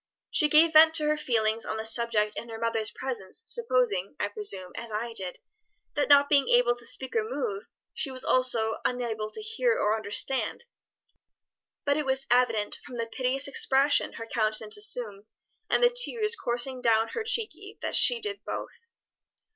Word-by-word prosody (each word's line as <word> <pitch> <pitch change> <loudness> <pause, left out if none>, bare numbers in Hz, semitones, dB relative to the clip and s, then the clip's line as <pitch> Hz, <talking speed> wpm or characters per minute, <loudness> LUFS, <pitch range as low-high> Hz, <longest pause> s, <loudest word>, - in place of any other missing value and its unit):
"She 300 -3 +3
gave 315 +2 +5
vent 315 +1 +7
to 305 - +5
her 305 - +2
feelings 225 -6 0
on 220 - -4
the 220 - -5
subject 225 -2 +1
in 235 - -6
her 225 - -7
mother's 225 -1 -1
presence, 250 - -5
supposing, 250 - 0
I 205 - -1
presume, 200 -3 -1
as 230 -1 -7
I 230 +2 -4
did, 190 -5 -4 0.6
that 290 - -1
not 285 0 +6
being 280 -2 +2
able 240 0 +4
to 240 -1 -5
speak 265 - 0
or 445 - +2
move, 435 -1 -4 0.3
she 280 - -2
was 260 -1 -8
also 235 -4 +2
unable 230 -4 -2
to 435 - -6
hear 460 +2 0
or 210 +1 +1
understand, 225 - -1 1.2
but 285 +1 +1
it 300 -3 -2
was 265 0 +1
evident 230 -4 +1
from 245 - -9
the 230 - -2
piteous 255 +4 -1
expression 275 +1 +2
her 230 - -7
countenance 215 -1 -2
assumed 205 -1 -2 0.4
and - - +2
the 485 - +5
tears 465 -3 +1
coursing 245 - -3
down 225 -2 +2
her 455 - -4
cheeky 430 -3 -1
that - - -3
she 485 - +5
did 415 -2 -4
both." - - -5
250 Hz, 175 wpm, -27 LUFS, 220-305 Hz, 1.2 s, vent